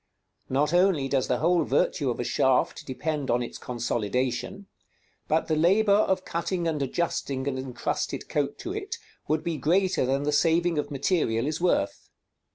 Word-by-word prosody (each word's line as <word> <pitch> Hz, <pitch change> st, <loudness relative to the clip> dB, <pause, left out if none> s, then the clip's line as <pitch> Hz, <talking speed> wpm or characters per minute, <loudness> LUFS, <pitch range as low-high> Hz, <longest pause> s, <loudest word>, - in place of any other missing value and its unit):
Not 145 Hz, +4 st, +1 dB
only 175 Hz, -6 st, +3 dB
does 135 Hz, -1 st, 0 dB
the 125 Hz, -, +1 dB
whole 170 Hz, +4 st, +3 dB
virtue 140 Hz, -4 st, +1 dB
of 120 Hz, -, -3 dB
a -, -, 0 dB
shaft 130 Hz, +2 st, +1 dB
depend 145 Hz, +1 st, -3 dB
on 120 Hz, +1 st, +2 dB
its -, -, -7 dB
consolidation, 125 Hz, -, -2 dB, 0.6 s
but 160 Hz, +1 st, +1 dB
the 155 Hz, -, +1 dB
labor 195 Hz, +7 st, +3 dB
of 190 Hz, -2 st, +3 dB
cutting 170 Hz, +1 st, -2 dB
and 155 Hz, -3 st, -1 dB
adjusting 140 Hz, -2 st, -2 dB
an 140 Hz, -, -1 dB
incrusted 130 Hz, -2 st, -3 dB
coat 145 Hz, -1 st, -1 dB
to 355 Hz, -, -5 dB
it 420 Hz, +2 st, -4 dB, 0.3 s
would 155 Hz, 0 st, 0 dB
be 170 Hz, -2 st, -2 dB
greater 180 Hz, +7 st, +2 dB
than 135 Hz, +2 st, 0 dB
the 150 Hz, -, 0 dB
saving 165 Hz, +2 st, +2 dB
of -, -, -3 dB
material 135 Hz, -5 st, 0 dB
is 155 Hz, +3 st, -2 dB
worth. 100 Hz, -, 0 dB
150 Hz, 165 wpm, -26 LUFS, 130-175 Hz, 0.6 s, only